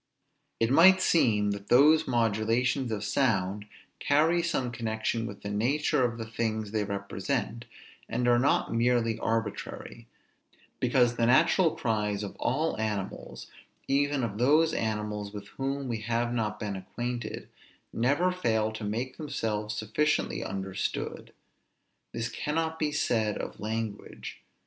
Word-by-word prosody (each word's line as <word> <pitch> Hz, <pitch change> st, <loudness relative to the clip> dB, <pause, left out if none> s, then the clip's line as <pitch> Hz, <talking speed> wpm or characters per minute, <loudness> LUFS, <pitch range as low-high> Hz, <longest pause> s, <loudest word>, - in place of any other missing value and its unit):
It 115 Hz, +1 st, +2 dB
might 185 Hz, +6 st, +7 dB
seem 110 Hz, -, +3 dB
that 100 Hz, 0 st, -6 dB
those 155 Hz, +5 st, +5 dB
modulations 120 Hz, +2 st, +1 dB
of 105 Hz, -1 st, -2 dB
sound 105 Hz, -5 st, 0 dB, 0.3 s
carry 160 Hz, +4 st, +3 dB
some 155 Hz, -8 st, -1 dB
connection 115 Hz, 0 st, -2 dB
with 100 Hz, -2 st, -9 dB
the 100 Hz, -, -4 dB
nature 130 Hz, +6 st, +1 dB
of 120 Hz, -2 st, 0 dB
the 115 Hz, -, -5 dB
things 110 Hz, -2 st, -2 dB
they 110 Hz, -1 st, 0 dB
represent, 100 Hz, +4 st, -3 dB, 0.4 s
and 125 Hz, -, 0 dB
are 120 Hz, 0 st, +5 dB
not 130 Hz, -, +2 dB
merely 115 Hz, -1 st, +2 dB
arbitrary; 115 Hz, 0 st, -3 dB, 0.7 s
because 120 Hz, -1 st, +2 dB
the 115 Hz, -, +2 dB
natural 165 Hz, +6 st, +4 dB
cries 105 Hz, -2 st, -1 dB
of 100 Hz, -, -6 dB
all 155 Hz, +5 st, 0 dB
animals, 105 Hz, -3 st, -4 dB, 0.4 s
even 140 Hz, -1 st, +1 dB
of 105 Hz, -2 st, -3 dB
those 155 Hz, +6 st, +4 dB
animals 105 Hz, -2 st, -2 dB
with 100 Hz, 0 st, -8 dB
whom 135 Hz, +2 st, -3 dB
we 115 Hz, -3 st, -2 dB
have 120 Hz, +2 st, -1 dB
not 105 Hz, -3 st, -2 dB
been 105 Hz, -2 st, -3 dB
acquainted, 120 Hz, +4 st, -5 dB, 0.5 s
never 145 Hz, +10 st, +2 dB
fail 110 Hz, -12 st, 0 dB
to 110 Hz, 0 st, -7 dB
make 115 Hz, +5 st, -3 dB
themselves 110 Hz, -8 st, -3 dB
sufficiently 110 Hz, +9 st, 0 dB
understood; 95 Hz, 0 st, -4 dB, 0.8 s
this 115 Hz, 0 st, -3 dB
cannot 160 Hz, +5 st, -2 dB
be 150 Hz, -1 st, 0 dB
said 110 Hz, -7 st, 0 dB
of -, -, -6 dB
language. 110 Hz, 0 st, -5 dB
115 Hz, 135 wpm, -28 LUFS, 105-135 Hz, 0.8 s, might